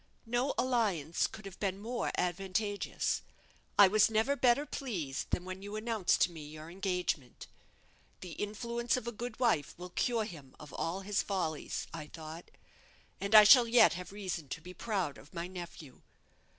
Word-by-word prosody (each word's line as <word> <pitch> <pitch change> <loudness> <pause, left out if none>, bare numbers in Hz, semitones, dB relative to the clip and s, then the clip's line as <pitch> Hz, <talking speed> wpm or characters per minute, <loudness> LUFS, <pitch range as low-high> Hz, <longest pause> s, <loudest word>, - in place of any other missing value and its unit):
No 245 +4 0
alliance 200 - +1
could 215 -2 -11
have 195 -1 -9
been 195 -2 -1
more 235 +3 -2
advantageous. 195 +3 -1 0.6
I 200 - +9
was 210 +3 +4
never 225 +6 +2
better 260 +2 +3
pleased 185 - -4
than 180 - -1
when 185 +1 -6
you 205 +1 -6
announced 215 -3 +1
to 180 - +4
me 160 -3 -9
your 155 +2 -9
engagement. 180 - -2 0.8
The 180 - -7
influence 235 +6 -2
of 250 - -5
a 235 - -2
good 240 +3 -6
wife 220 - +1
will 180 +1 -8
cure 230 +2 0
him 145 - -11
of 150 - -11
all 175 +4 -2
his 200 +1 0
follies, 180 -6 -2
I 155 -2 -6
thought, 160 +2 -9 0.7
and 200 +2 +1
I 215 - +12
shall 240 +3 +8
yet 235 -4 +6
have 180 +2 -7
reason 185 -7 -5
to - - -4
be 180 +2 -10
proud 185 - -2
of 150 +7 -17
my 170 0 -3
nephew." 175 -6 -9
195 Hz, 170 wpm, -32 LUFS, 170-225 Hz, 0.8 s, I